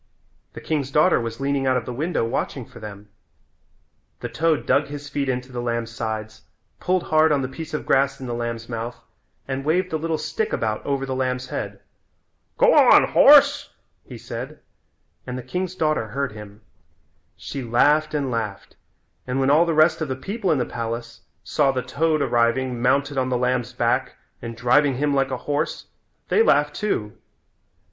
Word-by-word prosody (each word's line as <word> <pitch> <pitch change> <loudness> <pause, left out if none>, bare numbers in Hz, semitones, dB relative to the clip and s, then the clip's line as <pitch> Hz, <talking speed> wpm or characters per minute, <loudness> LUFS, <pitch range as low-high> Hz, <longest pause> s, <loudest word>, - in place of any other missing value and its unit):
The - - -9
king's 145 -4 -2
daughter 150 0 +3
was 115 +1 -5
leaning 140 -1 0
out 130 -1 +3
of 120 - -3
the 125 - -5
window 155 0 -1
watching 125 +1 -3
for 115 - -14
them. 105 -1 -10 1.1
The - - -4
toad 160 -2 0
dug 145 0 +2
his 145 0 -7
feet 140 -1 -2
into 125 0 -3
the 120 -1 -4
lamb's 115 -1 -2
sides, 110 -1 -5 0.4
pulled 185 -1 0
hard 155 0 +3
on 140 -2 +2
the - - -2
piece 160 +4 -8
of - - -2
the - - -16
grass 135 0 +2
in 130 - -7
the 120 - -4
lamb's 115 -1 -4
mouth 115 0 -5 0.5
and 135 0 -3
waved 180 +5 +1
the 160 - -1
little 160 0 -1
stick 160 +8 -3
about 110 -1 -1
over 140 -1 -1
the 135 - -3
lamb's 130 -1 -2
head. - - -5 0.8
"Go - - +5
on, - - +6
horse," - - +6 0.3
he - - -10
said - - -7 0.7
and 125 0 -4
the 130 - -6
king's 180 +8 -4
daughter 155 -9 0
heard 135 +4 -3
him. 105 0 -11 0.8
She 140 - -6
laughed 145 +6 +2
and 140 -3 -1
laughed, 110 -4 -4 0.5
and 130 +1 -1
when 135 +1 +3
all 165 +4 +5
the 165 - 0
rest 160 +1 +4
of 155 - -1
the 130 - -3
people 195 - -2
in 155 - +2
the 125 - 0
palace 115 0 -5 0.2
saw 140 -2 +2
the 130 -2 -2
toad 155 +4 0
arriving 120 +1 +1
mounted 140 +2 +1
on 130 0 0
the 125 - +1
lamb's 125 -1 0
back - - 0 0.3
and 115 -1 -7
driving 130 +3 +3
him 145 +2 0
like 135 -1 +1
a 130 - -2
horse 145 +2 -2 0.4
they 440 - +4
laughed 455 - +3
too. 110 - -2
130 Hz, 185 wpm, -23 LUFS, 120-150 Hz, 1.1 s, on